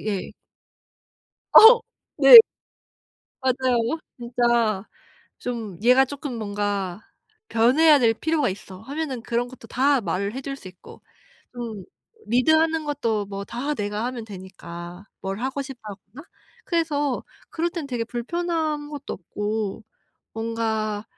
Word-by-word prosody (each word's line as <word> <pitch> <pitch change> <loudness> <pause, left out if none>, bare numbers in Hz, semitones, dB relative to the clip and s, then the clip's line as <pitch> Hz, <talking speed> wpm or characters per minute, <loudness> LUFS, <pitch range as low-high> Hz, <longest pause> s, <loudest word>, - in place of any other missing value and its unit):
예. 205 -3 -3 1.2
어. 465 +2 +10 0.4
네. 485 - +12 1.0
맞아요. 255 +1 +1 0.2
진짜 235 -4 +1 0.5
좀 225 -7 -5
얘가 255 +3 +6
"쪼끔 280 -1 -6
뭔가 205 -3 -3 0.5
변해야 280 +7 +5
될 230 -3 +3
필요가 300 +3 0
있어." 190 -1 -9
하면은 280 -3 -4
그런 240 +1 -2
것도 250 -2 -14
다 275 +3 +2
말을 200 0 -2
해줄 270 +1 -5
수 235 - -12
있고 180 -1 -16 0.5
좀 230 -5 -6 0.4
리드하는 315 +6 +3
것도 230 -8 -1
뭐 200 0 -6
다 255 +8 -3
내가 210 -3 -3
하면 245 -2 -5
되니까 180 -2 -10 0.2
뭘 195 +1 -4
하고 265 +3 -3
싶어 270 -2 -9
하거나 210 - -12 0.4
그래서 295 -6 -1 0.3
그럴 335 +1 -1
때는 335 -4 -6
되게 245 -3 -2
불편한 305 +5 -3
것도 290 -1 -6
없고 210 +3 -4 0.5
뭔가 220 -2 -2
240 Hz, 230 characters per minute, -23 LUFS, 210-285 Hz, 1.2 s, 네